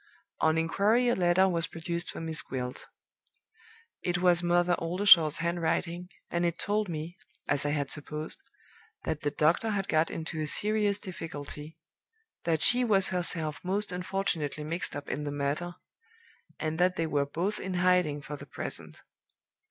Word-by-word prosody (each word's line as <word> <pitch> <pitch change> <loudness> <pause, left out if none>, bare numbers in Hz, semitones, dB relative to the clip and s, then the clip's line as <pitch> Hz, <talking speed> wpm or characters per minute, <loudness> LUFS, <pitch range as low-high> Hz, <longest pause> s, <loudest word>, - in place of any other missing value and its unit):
"On 160 0 +3
inquiry 210 +9 +2
a 240 - +2
letter 180 +1 +3
was 170 -3 0
produced 170 +1 -4
for - - -6
'Miss 160 -1 +1
Gwilt.' 125 -1 -6 1.1
It 175 0 0
was 175 -1 +5
in 175 - -2
Mother 175 0 +3
Oldershaw's 170 -3 +5
handwriting, 170 +1 -2 0.2
and 170 0 0
it 170 -1 0
told 210 -1 -1
me 165 +2 -5 0.3
(as 145 0 +2
I - - +1
had 145 -2 -1
supposed) 150 - -3 0.6
that 155 - -3
the 145 - 0
doctor 155 +9 +2
had 200 -3 -1
got 155 +1 +2
into 160 -1 -5
a 155 - -2
serious 210 +2 +1
difficulty 160 -5 -8 0.7
that 160 -2 +2
she 250 +7 +8
was 200 -5 +4
herself 170 -4 -1
most 195 +2 -1
unfortunately 180 -5 -2
mixed 165 +4 -2
up 145 0 -6
in 150 - -3
the 145 - -3
matter, 145 +5 -2 0.8
and 155 +1 -3
that 180 +1 +3
they 165 - -1
were 145 -3 0
both 185 +8 -2
in 185 -1 -4
hiding 175 -5 +2
for 150 - -6
the - - -11
present. - - -6
170 Hz, 160 wpm, -29 LUFS, 155-185 Hz, 1.1 s, she